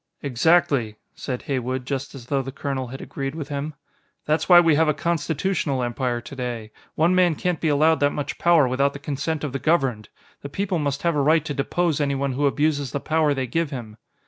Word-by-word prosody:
"Exactly," 140 -4 +2 0.2
said 125 -2 -5
Heywood, 130 -1 -2
just 140 +1 -4
as 125 -3 -10
though 135 +2 0
the 135 0 -6
colonel 135 -1 -3
had 135 +3 -8
agreed 135 +1 -5
with 155 -3 -6
him. 145 +1 -4 0.5
"That's 155 +2 0
why 175 -1 +10
we 165 -2 +4
have 160 +2 +3
a 150 - +2
constitutional 160 -3 -1
Empire 120 0 -1
today. 120 -4 -6 0.2
One 170 +3 +3
man 180 -3 +3
can't 180 +1 -2
be 160 - +1
allowed 155 +2 +3
that 145 - +3
much 145 0 -5
power 170 -5 +5
without 140 +3 +1
the - - -6
consent 145 +2 -3
of 145 -4 -3
the 135 - -2
governed. 135 -10 +1 0.3
The 140 - -7
people 190 +3 -1
must 145 -1 -2
have 170 -2 +2
a 145 - +2
right 155 +2 +3
to 145 - -3
depose 155 +2 0
anyone 140 -1 0
who 140 +3 +1
abuses 145 -2 0
the 140 - -1
power 155 -1 +1
they 130 -1 -1
give 165 +5 -1
him." 120 -6 -7
140 Hz, 210 wpm, -23 LUFS, 135-160 Hz, 0.5 s, why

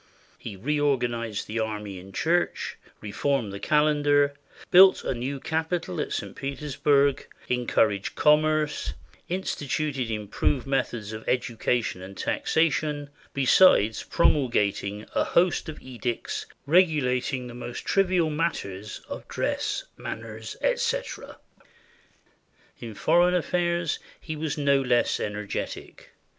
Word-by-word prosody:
He 100 - -7
reorganized 120 -3 0
the 115 +2 -3
army 105 -3 -4
and 95 +2 -12
church, 170 - 0 0.3
reformed 110 0 -1
the 100 - -6
calendar, 145 -1 +3 0.4
built 190 +1 +8
a - - -1
new 130 +3 -4
capitol 160 - -2
at - - -4
St. - - -4
Petersburg, 140 0 +1 0.2
encouraged 115 -5 +1
commerce, 150 0 +2 0.3
instituted 145 -7 -2
improved 110 +5 -1
methods 120 -6 -2
of 110 0 -7
education 120 -4 0
and 95 +1 -10
taxation, 150 -2 0 0.2
besides 130 - +5
promulgating 105 -9 +1
a - - +2
host 175 -1 +2
of 155 - -7
edicts 120 -2 -4 0.2
regulating 140 -6 +2
the 120 - -8
most 120 0 -7
trivial 185 -5 +2
matters 105 - -3
of - - -7
dress, - - -2
manners, 110 0 -7
etc. - - -1 1.4
In 115 -3 -8
foreign 175 - +3
affairs 175 -1 0 0.2
he 155 - -6
was 155 -1 -3
no 140 -1 +3
less 125 -2 +2
energetic. 105 -1 -5
135 Hz, 110 wpm, -26 LUFS, 110-155 Hz, 1.4 s, built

